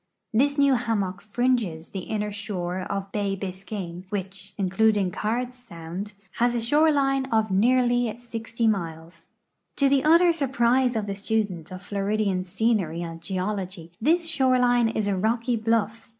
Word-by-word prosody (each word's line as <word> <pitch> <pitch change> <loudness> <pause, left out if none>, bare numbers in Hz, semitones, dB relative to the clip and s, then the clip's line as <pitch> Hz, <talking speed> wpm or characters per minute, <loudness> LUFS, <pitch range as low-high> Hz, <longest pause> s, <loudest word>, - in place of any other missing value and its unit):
This 280 +6 +2
new 280 -1 +5
hammock 205 -6 -1
fringes 215 -7 -1
the 195 - -5
inner 210 -1 -1
shore 190 -3 -4
of 195 0 -3
bay 200 -2 -1
Bisca\me, 185 -2 -6
which, 195 -1 -6
including 200 0 +2
Cards 240 +6 -2
sound, 190 -3 -8 0.2
has 240 +1 +2
a - - +1
shore 295 +7 +3
line 270 -2 +1
of 220 -4 +1
nearly 245 +3 +3
60 230 -1 -4
miles. 165 -2 -4 0.4
To 280 - +3
the 275 0 +3
utter 335 +3 +6
surprise 255 -4 +2
of 215 -2 -1
the 200 - -3
student 200 -4 -2
of 185 +1 -8
Floridian 200 -2 -1
scenery 190 -3 0
and 165 -1 -7
geology 185 -2 -3
this 330 +7 +3
shore 265 -5 +3
line 245 -2 +3
is 220 -2 -1
a 200 - +1
rock}" 225 +5 0 0.2
bluff. 225 0 0
215 Hz, 150 wpm, -25 LUFS, 190-245 Hz, 0.4 s, utter